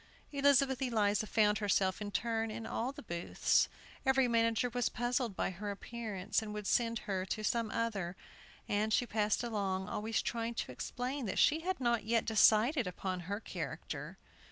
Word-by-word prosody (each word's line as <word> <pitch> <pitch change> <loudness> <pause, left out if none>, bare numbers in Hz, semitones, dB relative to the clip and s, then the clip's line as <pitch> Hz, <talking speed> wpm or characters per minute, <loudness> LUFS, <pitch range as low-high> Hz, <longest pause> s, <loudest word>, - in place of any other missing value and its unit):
Elizabeth 275 -2 +3
Eliza 215 -4 +1
found 210 -1 +3
herself, 195 -2 +1
in 205 - -3
turn, 225 +1 -1
in 225 +1 -5
all 240 +4 -2
the 280 - -11
booths. 170 -4 +1 0.3
Every 265 -1 +4
manager 230 +1 +2
was 245 -1 0
puzzled 240 -2 -1
by - - -1
her 205 +3 -5
appearance, 205 -2 -3
and 210 -1 -6
would 210 -1 -5
send 230 +2 +2
her 190 -2 -1
to 215 - -3
some 230 0 0
other, 200 -7 -2 0.5
and 210 +1 0
she 245 - +3
passed 215 0 0
along, 195 -5 -1
always 220 +1 -1
trying 230 0 -2
to 130 - -3
explain 250 - -4
that 190 - -3
she 310 - +5
had 370 +3 -2
not 235 -3 +1
yet 230 +1 +1
decided 225 - +4
upon 185 0 -3
her 205 +1 -1
character. - - -6
225 Hz, 170 wpm, -34 LUFS, 205-240 Hz, 0.5 s, she